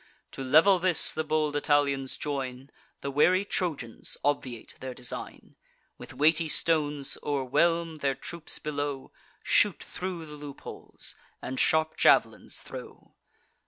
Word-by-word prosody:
To 135 - -6
level 160 +8 +6
this, 180 -1 +4
the 160 - -2
bold 155 -1 0
Italians 145 -2 +1
join; 135 -2 -4 0.3
The 140 - -3
wary 180 +7 +4
Trojans 155 - -3
obviate 130 -5 -2
their 130 -1 -6
design; 125 -2 -6 0.4
With - - -10
weighty 160 +2 +3
stones 150 -3 0
o'erwhelm 155 +4 +1
their 140 -2 0
troops 165 +4 -4
below, 145 -2 -4 0.3
Shoot - - +3
thro' 180 -3 -5
the 150 -1 -10
loopholes, 145 -1 -9 0.2
and 130 - -4
sharp 160 0 +2
jav'lins - - +3
throw. - - -10
145 Hz, 125 wpm, -28 LUFS, 135-160 Hz, 0.4 s, level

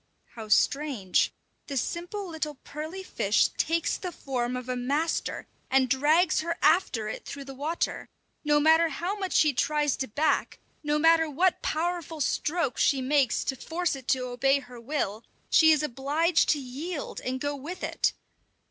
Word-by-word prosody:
How 220 -2 -8
strange! 250 -4 +2 0.4
The 275 - -3
simple 350 - -3
little 315 -3 -4
pearly 315 +6 -6
fish 205 - +2
takes 330 +1 0
the 365 - -5
form 250 -5 -3
of 250 0 -7
a 255 - -2
master, 285 +7 -1 0.2
and 265 -1 +3
drags 305 +6 +3
her 335 +1 -2
after 300 - +3
it 215 - -5
through 280 -1 -8
the 270 - -8
water; 300 +6 -3 0.3
no 295 -1 +3
matter 320 +2 +5
how 350 +7 -3
much 385 -3 -4
she 300 -2 +4
tries 295 +3 +1
to 265 - -3
back, 290 +9 0 0.3
no 295 0 +1
matter 325 +1 +4
what 350 +6 +1
powerful 335 -1 -2
strokes 300 -1 0
she 275 - +3
makes 265 -2 +2
to 265 - -2
force 335 +5 -2
it 265 -2 -11
to 255 -2 +1
obey 250 +3 +2
her 245 -3 -10
will, 230 -5 -2 0.3
she 320 -1 +7
is 305 -1 +3
obliged 300 +5 +1
to 300 - +3
yield 285 +5 -6
and 260 +1 -2
go 290 +1 -2
with 310 +7 -7
it. - - 0
295 Hz, 165 wpm, -27 LUFS, 260-325 Hz, 0.4 s, she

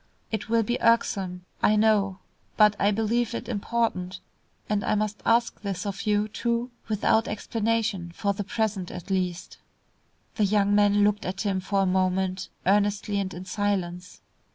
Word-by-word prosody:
It 220 0 -3
will 230 0 +3
be 240 +3 -2
irksome, 190 -6 +1 0.2
I 215 - +4
know, 210 -3 +3 0.4
but 210 -1 +6
I 200 - +3
believe 225 +3 0
it - - -5
important, 205 -5 -1 0.5
and 210 -1 0
I - - +1
must 210 0 -2
ask 235 +1 +2
this 195 -2 -4
of 200 +1 -4
you, 210 0 +2
too, 235 +3 -2 0.2
without 220 +1 +2
explanation, 215 -4 -1
for 200 +3 -1
the 205 - -4
present 210 -4 -2
at 180 +2 -8
least." 180 -2 -2 0.8
The 215 - +3
young 200 0 +2
man 205 0 +4
looked 210 +1 +2
at 190 +1 -3
him 195 -3 0
for 195 +1 0
a - - +2
moment, 185 0 0 0.2
earnestly 205 +1 +2
and 190 -1 -2
in 180 0 -8
silence. 185 -3 -2
205 Hz, 160 wpm, -26 LUFS, 190-220 Hz, 0.8 s, but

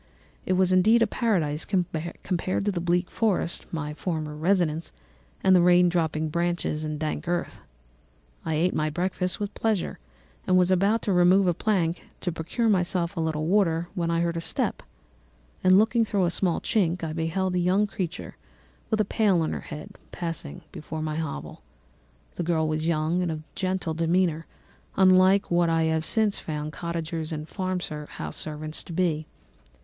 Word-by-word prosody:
It 185 - +2
was 185 0 +3
indeed 220 +6 +5
a - - +4
paradise 175 -10 0
compared 180 0 -2
to 205 - +2
the 175 -3 -3
bleak 175 +1 0
forest, 210 -6 -1
my 150 -2 -3
former 155 -2 -3
residence, 165 -1 0 0.5
the 185 -2 +6
rain 180 0 +5
dropping 160 -2 0
branches, 170 -2 -1
and 155 -1 -3
dank 155 +3 -3
earth. 175 0 -2 0.8
I 160 - -1
ate 175 +4 +2
my 155 0 0
breakfast 180 +4 -1
with 205 0 -3
pleasure 220 -5 -1 0.5
and 185 - +4
was 180 0 +4
about 200 +5 +2
to 200 - +1
remove 180 +2 +5
a 175 - +3
plank 175 -3 -1
to 180 - -1
procure 170 +9 -2
myself 180 -3 +1
a - - -3
little 160 -1 -1
water 175 -2 +2
when 170 -4 -1
I 170 0 +1
heard 170 0 0
a - - -2
step, - - -2 0.8
and 185 0 +6
looking 225 +3 +4
through 200 -4 +1
a 170 - +1
small 175 -1 0
chink, 180 -7 0
I 160 -1 -3
beheld 175 +3 -1
a 180 - +1
young 185 +4 +3
creature, 185 -4 -5 0.5
with 220 - +1
a 215 - +3
pail 200 -4 +2
on 155 - -1
her - - -3
head, 150 -1 -9
passing 165 - -4
before 155 +1 -6
my 155 0 -2
hovel. 155 - -5 0.8
The - - -1
girl 160 -2 +1
was 155 +1 -1
young 165 +2 +1
and 175 -2 -1
of 155 -1 -5
gentle 185 -3 -2
demeanour, 165 0 +1 0.5
unlike 185 +1 +5
what 175 -1 +3
I 165 0 +2
have 160 0 0
since 215 0 +1
found 150 -1 -5
cottagers 165 -1 -4
and 155 -1 -4
farmhouse 180 -6 -4
servants 155 0 -5
to 170 - -8
be. 160 -3 0
175 Hz, 170 wpm, -26 LUFS, 160-185 Hz, 0.8 s, the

